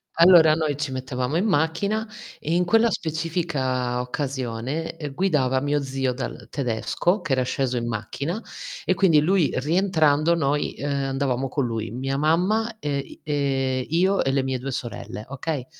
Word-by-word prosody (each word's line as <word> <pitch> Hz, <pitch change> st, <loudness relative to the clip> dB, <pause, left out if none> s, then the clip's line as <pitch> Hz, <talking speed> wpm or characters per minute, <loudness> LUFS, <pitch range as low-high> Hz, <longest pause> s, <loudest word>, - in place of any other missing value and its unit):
allora, 170 Hz, -2 st, +7 dB
noi 155 Hz, -3 st, 0 dB
ci 150 Hz, -2 st, -3 dB
mettevamo 130 Hz, +3 st, -2 dB
in 190 Hz, -, +1 dB
macchina 200 Hz, +5 st, +1 dB, 0.3 s
e 160 Hz, -, -2 dB
in 180 Hz, +1 st, +2 dB
quella 225 Hz, +5 st, +4 dB
specifica 155 Hz, -8 st, -1 dB
occasione, 130 Hz, +3 st, -3 dB
ehm, 150 Hz, -3 st, -5 dB
guidava 145 Hz, -8 st, +2 dB
mio 145 Hz, +2 st, 0 dB
zio 135 Hz, -1 st, -1 dB
dal 125 Hz, -4 st, -6 dB
tedesco, 140 Hz, -, 0 dB
che 155 Hz, -, -5 dB
era 130 Hz, -1 st, +3 dB
sceso 130 Hz, 0 st, -1 dB
in 120 Hz, 0 st, -2 dB
macchina 120 Hz, -, -3 dB, 0.5 s
e 185 Hz, -, +3 dB
quindi 175 Hz, -6 st, +4 dB
lui 175 Hz, 0 st, +2 dB
rientrando 160 Hz, 0 st, +2 dB
noi, 145 Hz, -2 st, 0 dB
uhm, -, -, -5 dB, 0.2 s
andavamo 135 Hz, -1 st, -1 dB
con 135 Hz, 0 st, 0 dB
lui. 115 Hz, -1 st, -3 dB
Mia 130 Hz, +5 st, -3 dB
mamma 205 Hz, +9 st, +1 dB
e 145 Hz, -1 st, -1 dB
i 135 Hz, -, -9 dB
ehm, 135 Hz, -3 st, 0 dB
io 185 Hz, +5 st, +2 dB
e 135 Hz, -, +1 dB
le 135 Hz, -1 st, +1 dB
mie 130 Hz, -1 st, -2 dB
2 135 Hz, +2 st, -4 dB
sorelle, 120 Hz, -3 st, -6 dB
okay 140 Hz, -1 st, -3 dB
145 Hz, 165 wpm, -24 LUFS, 130-165 Hz, 0.5 s, allora